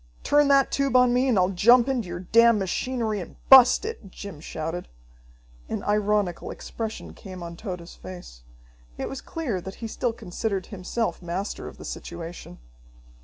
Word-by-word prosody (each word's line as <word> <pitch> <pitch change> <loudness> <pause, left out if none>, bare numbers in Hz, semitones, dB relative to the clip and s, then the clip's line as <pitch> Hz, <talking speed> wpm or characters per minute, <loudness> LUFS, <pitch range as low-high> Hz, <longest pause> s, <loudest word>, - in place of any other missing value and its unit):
"Turn 290 0 +4
that 275 -1 +4
tube 275 -2 0
on 250 -1 +6
me, 250 +2 +2
and 240 -5 +3
I'll 180 0 +3
jump 235 +7 +5
into 250 -7 -1
your 175 0 -5
damn 230 +4 +5
machinery 215 +3 -1
and 175 - -8
bust 265 +8 +8
it!" 440 - -6
Jim 195 -4 -9
shouted. 165 +3 -5 0.8
An - - -3
ironical 205 -3 0
expression 225 -1 -6
came 185 -3 -9
on 170 0 -7
Tode's 180 -3 -7
face. 90 -11 -11 0.6
It - - -3
was 270 - -6
clear 255 - -3
that 190 +2 -8
he 230 - -7
still 240 +2 -1
considered 195 -2 -3
himself 205 +3 -3
master 180 +3 -4
of - - -10
the - - -10
situation. 170 - -7
205 Hz, 165 wpm, -25 LUFS, 175-245 Hz, 0.8 s, bust